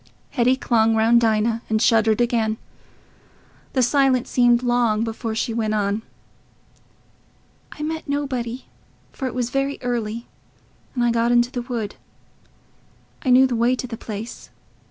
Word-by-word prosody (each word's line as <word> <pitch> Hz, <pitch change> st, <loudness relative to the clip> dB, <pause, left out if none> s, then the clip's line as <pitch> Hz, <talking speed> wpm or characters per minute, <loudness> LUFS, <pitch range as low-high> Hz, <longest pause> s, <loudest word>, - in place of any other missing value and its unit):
Hetty 250 Hz, +2 st, +3 dB
clung 225 Hz, -3 st, +2 dB
round 230 Hz, +2 st, +4 dB
Dinah 225 Hz, 0 st, +1 dB
and 220 Hz, 0 st, +2 dB
shuddered 220 Hz, -1 st, +3 dB
again. 225 Hz, -2 st, +1 dB, 1.2 s
The 260 Hz, -, +2 dB
silence 265 Hz, 0 st, +2 dB
seemed 245 Hz, -1 st, +4 dB
long 240 Hz, -3 st, +2 dB
before 225 Hz, 0 st, -4 dB
she 230 Hz, +1 st, -1 dB
went 220 Hz, -2 st, -1 dB
on. 205 Hz, +1 st, 0 dB, 1.7 s
"I 300 Hz, -, -7 dB
met 320 Hz, 0 st, -4 dB
nobody, 260 Hz, -4 st, -3 dB, 0.5 s
for 265 Hz, -, -4 dB
it 255 Hz, -, -6 dB
was 245 Hz, -1 st, -2 dB
very 275 Hz, +1 st, -1 dB
early, 235 Hz, -1 st, -2 dB, 0.7 s
and 245 Hz, -, +1 dB
I 240 Hz, -, +3 dB
got 230 Hz, +1 st, +1 dB
into 240 Hz, 0 st, +3 dB
the 250 Hz, -2 st, -3 dB
wood.... 235 Hz, -4 st, -5 dB, 1.3 s
I 260 Hz, -, -1 dB
knew 255 Hz, +1 st, +7 dB
the 255 Hz, -2 st, -1 dB
way 235 Hz, +2 st, +2 dB
to 255 Hz, -, -5 dB
the 240 Hz, -2 st, -6 dB
place... 220 Hz, +1 st, -8 dB
235 Hz, 145 wpm, -22 LUFS, 225-255 Hz, 1.7 s, knew